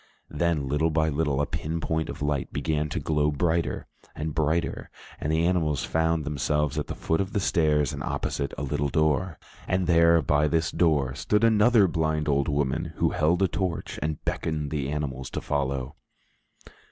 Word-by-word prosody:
Then, 75 -2 0
little 75 +4 +1
by 80 0 +1
little, 75 -2 0
a - - +1
pin 80 +2 -3
point 80 -1 -2
of - - -5
light 75 -2 -1
began 75 +1 -1
to 85 - -2
glow 75 -1 +1
brighter 80 +3 0 0.3
and 75 0 -3
brighter, 80 +2 -1 0.3
and 75 - -2
the 80 +1 +2
animals 80 -6 +1
found 80 -1 0
themselves 75 0 0
at 75 - -4
the - - -5
foot 80 +3 0
of 95 0 -4
the - - +1
stairs 75 -6 +2
and - - -5
opposite 70 -1 -2
a - - -3
little 70 0 -1
door. 80 +4 +1 0.3
And 90 0 +1
there, 85 0 +5
by 75 +2 +2
this 80 +1 0
door, 75 -7 +2
stood 105 - 0
another 110 -1 +5
blind 80 -2 -1
old 70 -1 +2
woman, 75 +3 -1
who 85 - +1
held 90 +2 +2
a - - +4
torch 90 -1 -3
and 75 0 -2
beckoned 75 -3 -2
to - - -3
the 70 -2 -2
animals 70 -3 -3
to - - -4
follow. 70 -2 -2
75 Hz, 185 wpm, -26 LUFS, 75-85 Hz, 0.3 s, there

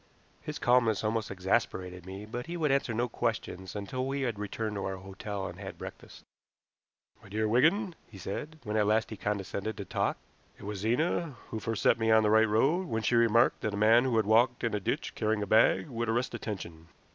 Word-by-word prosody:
His - - -5
calmness 120 -4 +3
almost 110 0 -1
exasperated 90 -1 -1
me, 95 +2 -7
but 120 +5 -6
he 175 +1 -4
would 155 -4 +1
answer 135 -3 +1
no 120 +2 0
questions 110 -6 -3
until 130 +6 -3
we 140 +1 -2
had 120 -6 -2
returned 105 +1 -3
to 100 - -3
our 95 - -2
hotel 95 +1 -6
and - - -7
had - - -7
breakfast. - - -10 1.0
"My - - -15
dear 110 +2 0
Wigan," 170 - +3 0.2
he 105 - -12
said, 150 - -5
when 105 -1 -2
at 105 -1 +3
last 110 +2 +2
he - - -4
condescended 100 +1 -3
to 100 - -5
talk, - - -1 0.4
"it - - -14
was 100 0 -5
Zena 140 - 0
who 110 - -4
first 115 -1 -3
set - - +4
me 115 0 +1
on 110 0 +6
the 105 - +3
right 110 0 +5
road, 145 - +2
when 110 -5 -2
she - - +1
remarked 115 0 +4
that 105 -1 -2
a - - -4
man 115 +4 +5
who 125 -3 +1
had 110 - +3
walked 120 +3 +3
in 115 - 0
a 105 - 0
ditch 95 - -2
carrying 110 -1 0
a - - -2
bag 110 +9 +4
would 120 -4 -3
arrest 120 +3 0
attention. 85 -6 -6
110 Hz, 215 wpm, -30 LUFS, 100-120 Hz, 1.0 s, on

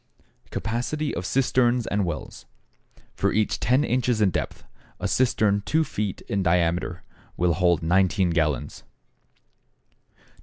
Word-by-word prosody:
=Capacity 125 +7 -2
of 90 +2 -3
Cisterns 125 -2 +2
or 105 - +1
Wells.= 85 -6 -5 0.7
For - - 0
each 110 -1 0
ten 125 +8 +2
inches 125 -3 0
in 100 -3 +3
depth, - - -4 0.4
a - - -1
cistern 105 -5 +2
2 160 +1 +2
feet 105 - -4
in 100 - -2
diameter 85 0 0 0.3
will 85 -1 +2
hold 85 -1 +2
19 90 +1 +2
gallons; 75 -6 -1 1.3
2 - - -40
1/2 - - -31
ft. - - -31
100 Hz, 140 wpm, -25 LUFS, 85-120 Hz, 1.3 s, in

